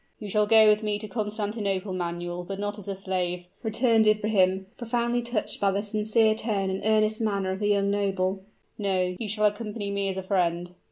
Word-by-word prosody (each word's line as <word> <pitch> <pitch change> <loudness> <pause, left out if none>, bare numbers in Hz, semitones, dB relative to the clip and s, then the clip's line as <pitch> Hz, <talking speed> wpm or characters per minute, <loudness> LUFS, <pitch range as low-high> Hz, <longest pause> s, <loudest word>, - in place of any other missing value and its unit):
"You 210 -3 -7
shall 210 +1 +2
go 220 0 +7
with 210 0 +4
me 210 -1 -1
to 215 +1 -6
Constantinople, 210 -2 -2
Manuel 175 0 -4
but 195 +2 -6
not 205 +1 -3
as 205 - -12
a 195 - -3
slave," 180 -2 -2 0.2
returned 225 -1 +3
Ibrahim, 200 -3 +2
profoundly 240 0 -1
touched 235 -2 -2
by 200 - +3
the 200 +1 -1
sincere 215 +1 +2
tone 210 -3 -1
and 190 - -3
earnest 215 +1 +2
manner 200 -3 0
of 190 - -4
the 205 - 0
young 200 -1 +2
noble; 195 -1 0 0.4
"no 185 -3 0
you 220 - -3
shall 210 +1 +1
accompany 210 -1 -2
me 200 0 -1
as 190 - -4
a 190 - -3
friend." 175 -2 0
205 Hz, 200 wpm, -26 LUFS, 190-215 Hz, 0.4 s, go